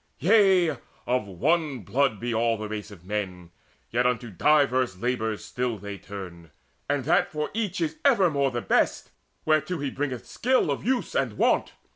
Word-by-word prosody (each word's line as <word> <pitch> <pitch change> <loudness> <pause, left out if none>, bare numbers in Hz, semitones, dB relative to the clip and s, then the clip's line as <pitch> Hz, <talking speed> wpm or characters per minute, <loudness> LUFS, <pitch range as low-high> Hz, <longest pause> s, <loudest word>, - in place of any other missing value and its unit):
Yea, 185 - +4 0.3
of 125 -4 0
one 140 - 0
blood 110 +3 +1
be 120 0 -2
all 115 0 +1
the 110 0 -5
race 105 0 -5
of 95 -4 -14
men, 95 -4 -4 0.4
Yet 125 +2 +2
unto 120 -2 -2
diverse 130 - +2
labours 110 -1 -2
still 125 -2 -2
they 100 0 -7
turn; 90 -5 -9 0.4
And 145 -3 0
that - - +2
for 150 -1 -3
each 205 -4 -2
is 160 -1 -1
evermore 180 - +3
the 120 -2 -3
best - - +1 0.3
Whereto 155 +3 +1
he 140 -3 -3
bringeth 135 -3 -3
skill 255 - +1
of 140 - -3
use 250 +3 0
and - - 0
wont. - - +1
125 Hz, 165 wpm, -26 LUFS, 105-155 Hz, 0.4 s, Yea